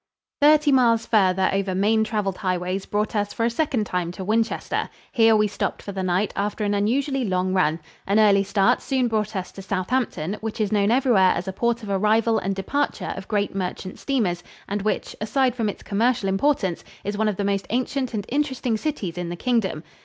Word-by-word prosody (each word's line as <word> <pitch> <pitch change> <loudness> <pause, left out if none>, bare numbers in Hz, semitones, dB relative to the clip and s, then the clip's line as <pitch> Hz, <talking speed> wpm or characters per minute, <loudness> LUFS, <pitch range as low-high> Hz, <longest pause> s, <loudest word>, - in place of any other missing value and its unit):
Thirty 300 0 +5
miles 235 -4 +4
farther 190 -3 +3
over 195 -1 -1
main 215 +3 +3
traveled 210 -3 -2
highways 185 0 -2
brought 210 +2 -1
us 205 -1 -1
for 230 - 0
a 235 - +1
second 255 -4 0
time 180 -3 -2
to 190 - -6
Winchester. 225 +3 -1 0.2
Here 225 -3 +5
we 210 0 +3
stopped 205 - -3
for 200 - -6
the 190 -1 -4
night 185 +2 0
after 205 +2 -2
an 205 0 0
unusually 260 +7 0
long 185 -3 0
run. 165 -4 +2 0.3
An 200 +2 +2
early 205 -2 +5
start 200 0 +2
soon 260 -3 0
brought 215 -2 -1
us 185 -1 -4
to 195 - -10
Southampton, 195 -2 -2
which 220 0 -5
is 215 -1 0
known 205 -1 +2
everywhere 235 -7 +4
as 175 - -4
a 190 - -3
port 235 +3 0
of 210 - -7
arrival 220 +3 +2
and 195 +1 -2
departure 285 +9 -2
of - - -8
great 205 -2 -1
merchant 185 0 -4
steamers 215 -11 0 0.3
and 205 +1 -2
which, 215 - -2
aside 250 +4 +1
from 230 -4 -1
its - - -7
commercial 215 0 +1
importance, 195 - 0 0.2
is 205 +1 -3
one 220 +1 +1
of 210 - 0
the 200 - -2
most 195 -1 -1
ancient 255 +1 -1
and 205 -2 -3
interesting 260 -4 0
cities 200 - -3
in 175 -1 -3
the 175 - -4
Kingdom. 195 -7 -1
210 Hz, 205 wpm, -23 LUFS, 190-235 Hz, 0.3 s, Thirty